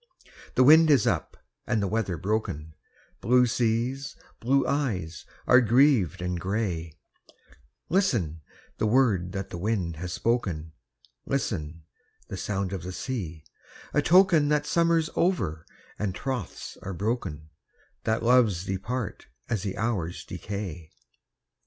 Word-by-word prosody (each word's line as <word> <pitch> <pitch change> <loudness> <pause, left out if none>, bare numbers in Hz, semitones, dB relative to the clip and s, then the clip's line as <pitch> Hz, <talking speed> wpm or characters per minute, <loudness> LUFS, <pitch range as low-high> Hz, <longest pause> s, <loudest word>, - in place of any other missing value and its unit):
The 130 - +5
wind 160 +4 +7
is 140 -8 +5
up, - - -1 0.3
and 115 -2 +1
the 100 - 0
weather 100 -4 -1
broken, 80 -6 -2 0.5
Blue 125 +3 +4
seas, 120 +4 -1 0.2
blue 135 +4 +2
eyes, 100 - -2 0.2
are 125 0 +6
grieved 120 - +3
and 90 -1 -2
grey, 90 -5 -2 0.9
Listen, 115 - +1 0.4
the 110 - +2
word 105 -7 +2
that 95 -1 -5
the 85 - -5
wind 90 -5 -1
has 90 +2 -5
spoken, 90 -8 -1 0.6
Listen, 85 - -2 0.5
the - - -5
sound 100 -2 -2
of 95 - -3
the 90 +2 -6
sea,—a 90 - -5
token 170 -5 +5
That 150 -1 +2
summer's 165 0 +2
over, 95 - 0 0.3
and 100 -3 -2
troths 130 -4 -5
are 95 -1 -5
broken,— 95 -7 -3 0.5
That 110 0 0
loves 115 -7 +3
depart 100 +4 -4 0.2
as 115 -5 0
the 100 -1 -4
hours 100 -7 -2
decay. 90 -6 -6
105 Hz, 125 wpm, -27 LUFS, 90-125 Hz, 0.9 s, wind